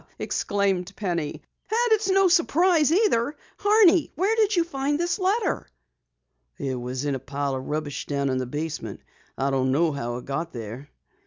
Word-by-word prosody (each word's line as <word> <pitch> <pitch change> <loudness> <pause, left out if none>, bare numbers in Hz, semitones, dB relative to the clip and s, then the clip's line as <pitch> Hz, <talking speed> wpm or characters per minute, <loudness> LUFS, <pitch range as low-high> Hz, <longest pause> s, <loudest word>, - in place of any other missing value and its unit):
exclaimed 200 -2 -1
Penny. 170 -7 -2 0.4
"And 470 +1 +1
it's 435 -2 +3
no 390 0 +5
surprise 340 -2 +3
either! 315 - +2 0.2
Horney, 405 -5 +5
where 395 +6 +1
did 430 -2 +2
you 345 - +3
find 290 -2 -2
this 345 +4 0
letter?" 390 +1 0 0.9
"It 135 -1 -3
was 125 +3 -4
in 145 - 0
a 135 - -2
pile 140 +1 -3
of 130 0 -5
rubbish 150 -1 -3
down 140 -1 -1
in 130 0 0
the 130 - -3
basement. 155 +4 -5 0.4
I 135 +1 0
don't 130 -1 +1
know 160 +4 +2
how 120 -4 -4
it 125 - -9
got 160 +5 -3
there." 120 +4 -7
180 Hz, 170 wpm, -25 LUFS, -, 0.9 s, no